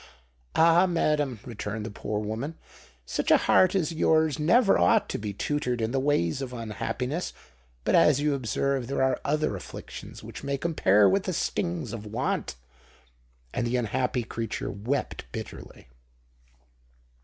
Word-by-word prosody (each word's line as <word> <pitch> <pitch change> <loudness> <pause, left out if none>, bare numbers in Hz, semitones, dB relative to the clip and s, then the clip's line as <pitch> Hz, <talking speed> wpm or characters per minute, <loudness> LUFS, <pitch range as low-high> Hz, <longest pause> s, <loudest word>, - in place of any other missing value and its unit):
"Ah! 170 +3 +6
madam," 150 - 0
returned 105 -2 -5
the 110 - -5
poor 105 +1 -3
woman, 110 +9 -4 0.5
"such - - -2
a - - +7
heart 185 +1 +4
as 170 -3 +1
yours 160 -2 +2
never 195 +8 +4
ought 85 0 +4
to - - -3
be 105 -1 -3
tutored 125 +3 -1
in 110 0 -1
the 135 - +1
ways 130 - +1
of 130 -2 -5
unhappiness. 125 - -3 0.5
But, - - +1
as 145 -2 +5
you 150 0 +1
observe, 135 0 -1
there 135 0 0
are 130 -1 +1
other 155 -4 0
afflictions 95 - -9
which - - -9
may 140 0 -1
compare 105 - +4
with 195 0 +2
the 185 - -1
stings 170 - -2
of 110 -2 -6
want!" 105 - -2 1.0
And 120 - -1
the 120 - 0
unhappy 125 +2 0
creature 115 -3 -4
wept 110 - -3
bitterly. - - -8
130 Hz, 150 wpm, -27 LUFS, 110-155 Hz, 1.0 s, a